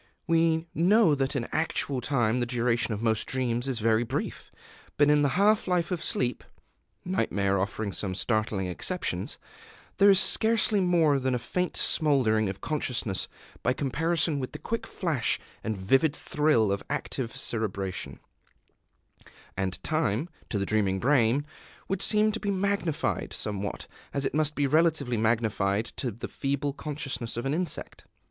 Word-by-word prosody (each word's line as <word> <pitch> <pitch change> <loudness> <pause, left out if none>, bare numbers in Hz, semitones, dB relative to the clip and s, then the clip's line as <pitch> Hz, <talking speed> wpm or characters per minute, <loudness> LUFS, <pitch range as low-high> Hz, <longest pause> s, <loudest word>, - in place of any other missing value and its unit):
We 165 -1 +2
know 185 +1 +4
that 135 0 0
in 120 -3 -1
actual 145 -4 -1
time 120 -3 +1
the 120 - 0
duration 120 0 0
of 105 +1 -3
most 110 -1 +1
dreams 125 -1 -1
is 130 -3 -1
very 115 +1 +2
brief. 115 - -4 0.5
But 145 0 +5
in 150 0 +4
the 145 +3 +1
half 210 +2 +3
life 175 -1 +1
of 180 - -2
sleep 125 0 -1 0.6
(nightmare 100 - 0
offering 100 +2 -2
some 95 -1 -3
startling 105 -1 0
exceptions) 90 - -3 0.6
there 200 +1 +7
is 195 -2 +7
scarcely 220 -1 +3
more 170 -6 +3
than 130 -1 0
a - - +1
faint 180 +10 -2
smouldering 120 -9 +2
of 95 0 -6
consciousness 120 - -2 0.3
by 125 - +2
comparison 150 +3 0
with 130 +1 -5
the - - -5
quick 230 +8 -4
flash 160 - -1 0.2
and 110 -2 -2
vivid 135 +11 +2
thrill 150 -12 +2
of 100 - -1
active 135 -4 -3
cerebration; 100 -4 -3 1.4
and 95 -1 -3
time, 155 - 0 0.2
to 105 - -1
the 100 - 0
dreaming 100 -3 +1
brain, 130 +1 +3 0.4
would 195 -1 -2
seem 215 0 +3
to 225 - -4
be 205 - -3
magnified, 200 -4 -1
somewhat 100 -1 -3 0.3
as 140 -1 0
it - - -1
must 150 0 0
be 145 - +1
relatively 155 -3 +2
magnified 110 -2 +1
to 125 +1 -4
the 115 +1 -6
feeble 140 0 -2
consciousness 135 -6 -4
of 120 - -3
an 135 - 0
insect. 170 -1 -4
135 Hz, 155 wpm, -28 LUFS, 110-160 Hz, 1.4 s, there